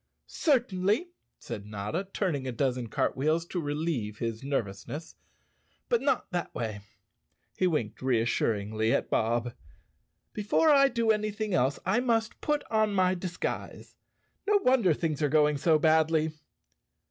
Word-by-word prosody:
"Certainly," 235 - +1 0.3
said 105 -3 -7
Notta, 105 - -4
turning 150 -11 -1
a - - -2
dozen 125 -1 -1
cartwheels 155 +9 0
to 175 0 -3
relieve 145 -8 -2
his 115 -1 -3
nervousness, 135 +4 -4 0.7
"but 475 - +2
not 275 -1 0
that 175 -2 -3
way." 110 -4 -4 0.7
He 185 - +2
winked 120 -11 -2
reassuringly 110 -3 0
at - - -2
Bob. 120 +1 0 0.8
"Before 215 +9 +3
I 275 -1 +6
do 235 -4 +1
anything 215 -1 -1
else 135 -4 +2
I 190 +6 +2
must 230 -3 0
put 295 -1 0
on 215 -2 +2
my 185 -1 +3
disguise. 180 -1 -5 0.5
No 415 0 +5
wonder 235 - +4
things 155 -2 -2
are 150 - +2
going 150 0 +3
so 155 +2 +3
badly." 160 0 +3
160 Hz, 135 wpm, -29 LUFS, -, 0.8 s, I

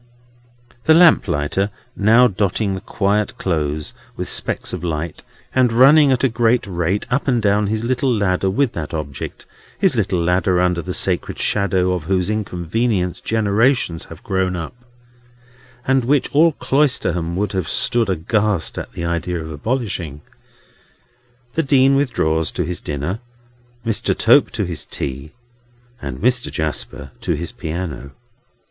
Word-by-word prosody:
The 160 - +6
lamplighter 100 - +3 0.3
now 115 +5 +5
dotting 100 0 -1
the 95 - -5
quiet 105 +1 -1
Close 75 -4 -2 0.2
with - - -3
specks - - -1
of 90 -2 -5
light, 80 -1 -3 0.3
and 130 -2 +3
running 140 +4 +6
at 130 0 +1
a - - +5
great 120 0 +1
rate 90 +1 -1
up 135 +4 0
and 125 -3 +2
down 105 -1 +2
his 110 +2 -1
little 130 +2 0
ladder 95 -4 +1
with 120 +6 +1
that 80 -1 -5
object—his 75 -3 -4
little 90 - 0
ladder 90 +2 +2
under 90 -1 +1
the - - -4
sacred - - 0
shadow 95 -2 +1
of 90 -4 -4
whose 95 +2 0
inconvenience 95 -1 -1
generations 110 -3 +1
had - - -12
grown 95 -1 0
up, 85 -2 -5 1.1
and 135 -1 +2
which 140 +3 +1
all 160 +3 +4
Cloisterham 95 - 0
would 105 +3 -1
have 95 -4 -2
stood 115 -3 +1
aghast 100 +1 0
at - - -8
the 85 - -4
idea 85 +1 -2
of 80 0 -7
abolishing—the 85 - -3 1.4
Dean 135 -2 +4
withdraws 80 - +1
to - - -2
his 90 0 -4
dinner, 75 +8 -3 0.7
Mr. 115 -2 0
Tope - - +5
to - - -2
his - - -4
tea, 70 +3 -6 0.7
and 70 -3 -5
Mr. 125 - +1
Jasper 75 -3 -3
to - - 0
his 85 +3 -5
piano. 80 -4 -5
95 Hz, 140 wpm, -19 LUFS, 85-120 Hz, 1.4 s, The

